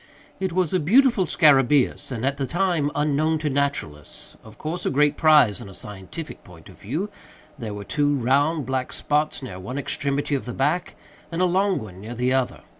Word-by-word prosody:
It 190 -1 -1
was 180 -1 0
a 185 - +3
beautiful 225 - +4
scarabæus, 140 -4 +3
and, 125 -1 -3
at 140 +1 0
that 135 -2 -3
time, 175 -5 +1
unknown 150 +2 +1
to 150 -1 -2
naturalists—of 110 - -4
course 170 +3 -4
a - - 0
great 145 +1 +2
prize 150 -10 +4
in - - -9
a 95 - -11
scientific 105 - -8
point 85 -4 -15
of - - -16
view. 155 - -3 0.5
There 110 -4 -5
were 100 - -6
two 145 +6 +1
round, 140 +4 +1
black 130 -1 -2
spots 150 -1 0
near 95 -7 -7
one 105 +9 -6
extremity 140 +1 -1
of 140 - -1
the 125 - -5
back, 150 +8 -1 0.4
and 165 - -3
a 185 - +4
long 190 +2 +2
one 95 -3 -8
near 115 +4 -7
the 125 +2 +1
other. 130 -2 -1
140 Hz, 190 wpm, -23 LUFS, 125-160 Hz, 0.5 s, beautiful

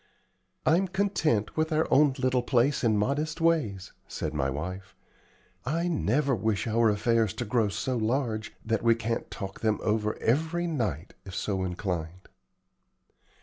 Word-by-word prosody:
"I'm 175 +5 +3
content 180 - 0
with 160 +1 0
our 155 +1 +2
own 140 0 +5
little 130 -1 +1
place 125 +3 +2
and 110 -3 +3
modest 145 +9 -1
ways," 150 - +1 0.2
said 80 - -4
my 70 -3 0
wife. 90 +7 -5 0.7
"I 165 +7 -1
never 140 - +1
wish 110 -2 0
our 115 0 +3
affairs 110 0 +1
to 120 - -3
grow 110 -1 +1
so 120 +5 -2
large 115 -1 -1
that 115 -1 0
we 115 0 +4
can't 115 0 -3
talk 95 -3 -7
them 110 -2 +1
over 105 0 0
every 160 +8 0
night, 105 - -2
if 95 -2 -9
so 95 -3 -1
inclined." 90 -1 -4
115 Hz, 145 wpm, -28 LUFS, 105-145 Hz, 0.7 s, own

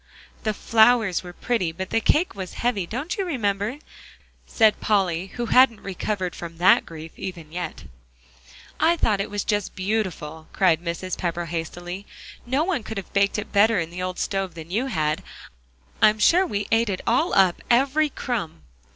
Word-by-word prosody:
"The 215 - -1
flowers 220 -4 +4
were 180 - -9
pretty, 185 -3 -1
but 190 +3 -6
the 225 - +2
cake 325 +9 +2
was 190 -2 -7
heavy, 220 -7 -1
don't 280 - -4
you - - +1
remember?" 220 - -1 0.7
said 220 -2 +3
Polly, 190 -4 +1
who 240 - -2
hadn't 235 -2 +4
recovered 190 -1 -3
from 165 -1 -8
that 175 - +5
grief 160 0 -9
even 170 -5 -7
yet. 175 +2 -5 1.0
"I 330 +2 +3
thought 210 -9 +1
it 200 - -4
was 205 -1 -2
just 205 -2 -1
beautiful," 185 -6 -3
cried 170 -4 +3
Mrs. 175 +2 -3
Pepper 175 -1 -2
hastily. 175 +3 -5 0.4
"No 265 +5 +1
one 345 -6 -1
could 220 0 -7
have 195 - -7
baked 200 +1 +2
it 210 - -5
better 215 +2 +5
in 165 0 -3
the 180 +1 -6
old 185 0 -3
stove 195 -3 -2
you 185 +11 -2
had. 155 - -1 0.8
I'm 215 -1 +6
sure 355 - +4
we 205 -7 -2
ate 225 0 +3
it 190 - -2
all 265 +9 +2
up, 190 -3 +4
every 275 +5 +3
crumb." 210 - -4
200 Hz, 170 wpm, -24 LUFS, 175-230 Hz, 1.0 s, I'm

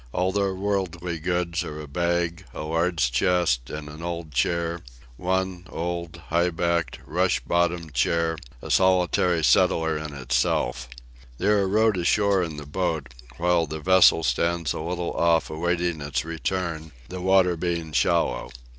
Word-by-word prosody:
All 90 +1 +1
their 100 -1 0
worldly 90 -4 -2
goods 90 0 -1
are 75 0 -7
a 75 - -7
bag, 85 +2 -1
a - - -4
large 80 -4 0
chest 65 -3 +1
and 75 0 -6
an 75 +2 -10
old 85 -2 -5
chair: 85 +5 0 0.4
one, 95 +4 -2
old, 85 0 -4
high 85 +2 +2
backed, 85 -1 -1
rush - - +1
bottomed 85 -2 0
chair: 80 +6 +1 0.3
a - - -5
solitary 90 -2 +3
settler 80 -3 +3
in 75 -2 -7
itself. 60 -1 0 0.5
They - - -3
are 100 -2 +3
rowed 110 +1 +3
ashore 100 +2 +2
in 80 -4 -4
the 75 - -7
boat, 75 -4 -2 0.2
while 85 -1 +2
the 80 +2 -5
vessel 90 -1 +5
stands 85 -3 0
a - - -5
little 85 +1 -3
off 85 -1 +2
awaiting 85 0 -1
its 70 -1 -2
return, 80 -1 -3 0.2
the 90 0 -6
water 95 -1 +4
being 85 -2 -3
shallow. 75 -5 +1
85 Hz, 150 wpm, -25 LUFS, 80-90 Hz, 0.5 s, vessel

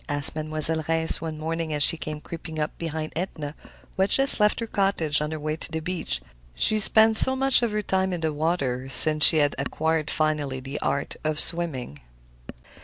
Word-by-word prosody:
asked 145 0 +4
Mademoiselle 155 +1 +4
Reisz 160 0 +1
one 160 -1 -7
morning 165 +1 -5
as 150 -1 0
she - - +4
came 155 -1 -8
creeping 160 +1 -10
up 150 0 -4
behind 160 -1 -6
Edna, 155 -4 -6 0.4
who 190 - -3
had 195 - +1
just 270 -2 +2
left 210 0 +1
her 230 - -4
cottage 195 -9 -1
on 150 - -4
her 155 0 -7
way 155 +1 -4
to 165 - -10
the 160 - -4
beach. 160 - -4 0.3
She 215 - 0
spent 220 +1 +7
much 270 -1 +3
of 235 -2 -2
her 210 0 -3
time 190 -1 -2
in 175 -2 -5
the 160 -1 -3
water 140 -5 -3
since 155 +2 +2
she 160 - +9
had 145 -1 0
acquired 155 +2 -3
finally 150 -4 -3
the 135 +2 -8
art 140 0 -4
of 155 -1 -3
swimming. 140 - -4
155 Hz, 195 wpm, -23 LUFS, 150-175 Hz, 0.4 s, she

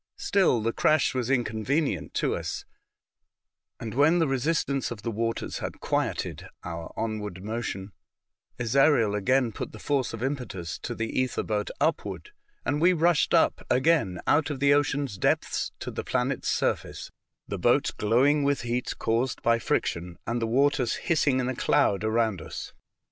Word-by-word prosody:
Still, 185 - +2
the 115 +1 0
crash 155 -2 +3
was 125 -2 -2
inconvenient 130 +4 0
to - - +1
us, - - -4 1.1
and 110 -2 -5
when 145 +7 +4
the 165 -3 +2
resistance 135 0 0
of 110 -4 -7
the 115 - -2
waters 115 +1 -2
had - - -5
quieted - - -2 0.2
our 85 0 -6
onward 105 -4 -4
motion, 105 -3 -4 0.7
Ezariel 120 -2 +3
again 120 +4 +2
jout - - -6
the - - -8
force 135 +2 -1
of 115 +1 -6
impetus 120 - -4
to 120 - -5
the 115 - -2
ether 130 -1 0
boat 105 -1 -2
upward, 420 - -1 0.3
and 145 +1 0
we 180 +2 +5
rushed 170 -1 +3
up - - +3
again 130 - +2
out 155 +1 +3
of 145 -3 -4
the 140 +1 +5
ocean 145 0 +1
depths 100 -8 -1
to - - -6
the - - -4
planet's 130 +1 -1
surface, - - -1 0.4
the - - -4
boat - - +3
glowing 130 +8 +3
with 140 0 +1
heat 120 +1 -2
caused 120 +3 -1
by 115 0 +3
friction, 85 -5 -2
and 120 +1 -2
the 115 - 0
waters 135 +1 +2
hissing 145 -5 +1
in 125 - -1
a 130 - -2
cloud 100 -3 +2
around 110 -4 +1
us. - - -7
125 Hz, 160 wpm, -27 LUFS, 110-140 Hz, 1.1 s, we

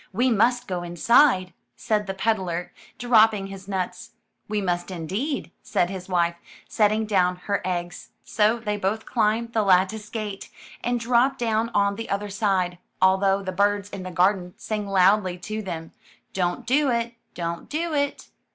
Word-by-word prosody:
'*We 245 +6 +2
must 245 +3 +2
go 180 -2 -2
inside," 185 - +3 0.2
said 210 -3 -1
the 195 - -3
peddler, 185 -5 -1 0.2
dropping 220 -4 +4
his 195 0 -9
nuts. 185 -2 -4 0.3
*'We 210 0 -1
must 175 -2 -1
indeed,'' 195 - -3
said 175 +1 0
his 190 -1 -7
wife, 170 -1 +1 0.3
setting 215 +1 +2
down 185 -4 +2
her 200 -1 0
eggs. 175 -1 -4
So 215 +2 +2
they 210 -3 -3
both 205 +3 -2
climbed 230 +2 0
the 220 - +2
lattice 195 +2 +2
gate, 210 -3 -5 0.3
and 245 0 0
dropped 240 +3 +2
down 225 -1 0
on 200 0 +2
the 225 - -6
other 200 +1 -2
side, 190 -3 0 0.2
although 195 +1 +3
the 185 - -3
birds 205 +1 +1
in 195 - -6
the 185 - -6
garden 180 0 +1
sang 210 -2 -4
loudly 190 -1 +3
to 215 +5 -5
them, 165 -5 -6 0.2
*' - - -36
Don't 180 +5 -1
do 275 +3 +2
it. 235 -1 -1 0.2
Don't 170 -1 -4
do 325 +2 -2
it." 285 -1 -1
200 Hz, 165 wpm, -24 LUFS, 185-225 Hz, 0.3 s, dropping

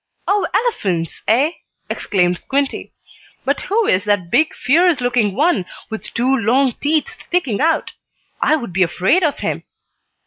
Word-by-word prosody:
"Oh, 405 0 +2
elephants, 200 - -1
eh!" 265 +8 +3 0.4
exclaimed 180 -3 0
Squinty. 275 0 -2 0.5
"But - - 0
who 440 +3 0
is 185 - +2
that 205 -5 0
big, 310 +5 +2
fierce 335 +3 +3
looking 240 -5 +1
one, 285 - +1 0.2
with 220 - -6
two 255 +3 +2
long 250 +3 +2
teeth 305 +1 +1
sticking 280 - -2
out. 325 +1 +1 0.5
I 310 - +4
would 235 - -5
be 190 - 0
afraid 185 - +2
of 300 -3 +1
him." - - -3
255 Hz, 145 wpm, -18 LUFS, 200-315 Hz, 0.5 s, I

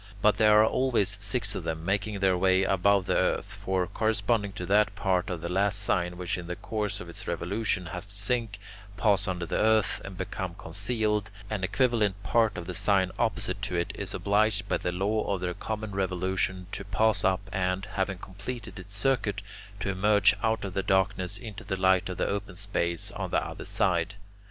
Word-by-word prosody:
But 105 +1 +4
there 105 -1 +6
are 110 - +7
always 110 -5 +1
six 100 +1 +2
of 95 - -4
them 80 0 -4
making 100 +1 -1
their 95 -1 +4
way 95 +1 +3
above 95 0 +3
the - - +1
earth; - - 0
for, 95 -1 +1
corresponding 105 +1 0
to 90 -3 -5
that 105 +2 +3
part 95 -2 0
of 90 -3 -3
the - - -3
last 100 +3 +1
sign 90 -3 +1
which 90 0 -2
in 85 - -8
the 90 - -3
course 105 0 -3
of 90 - -8
its 85 - -6
revolution 100 0 -1
has 90 +2 -5
to 100 - -8
sink, 115 0 0 0.4
pass 100 -1 +3
under 90 -2 -2
the - - -1
earth, 110 -1 +3
and 95 -2 -8
become 95 -1 -4
concealed, 105 +4 -1 0.2
an 105 -3 -2
equivalent 105 -2 +1
part 110 +4 +2
of 85 - -5
the 90 - -5
sign 95 -1 +2
opposite 105 -4 -1
to 95 -2 -2
it 85 0 0
is - - -5
obliged 100 0 +1
by - - +1
the 90 - -2
law 100 +4 0
of 95 - -6
their 90 -1 -1
common 110 +2 -4
revolution 95 0 -1
to - - -4
pass 110 +2 +2
up 95 +2 +1
and, 90 +1 0
having 95 -1 -1
completed 105 +5 -7
its 100 +2 -8
circuit, 110 -7 +1 0.4
to 100 - -2
emerge 100 +2 +4
out 110 -2 0
of 95 - -5
the 95 - 0
darkness 95 -1 +1
into 110 -2 -8
the 95 -3 -3
light 95 0 +3
of 95 - -5
the - - 0
open 100 -2 -3
space 85 -4 -1
on - - -4
the - - +1
other - - -7
side. 90 +2 0
100 Hz, 200 wpm, -28 LUFS, 95-105 Hz, 0.4 s, are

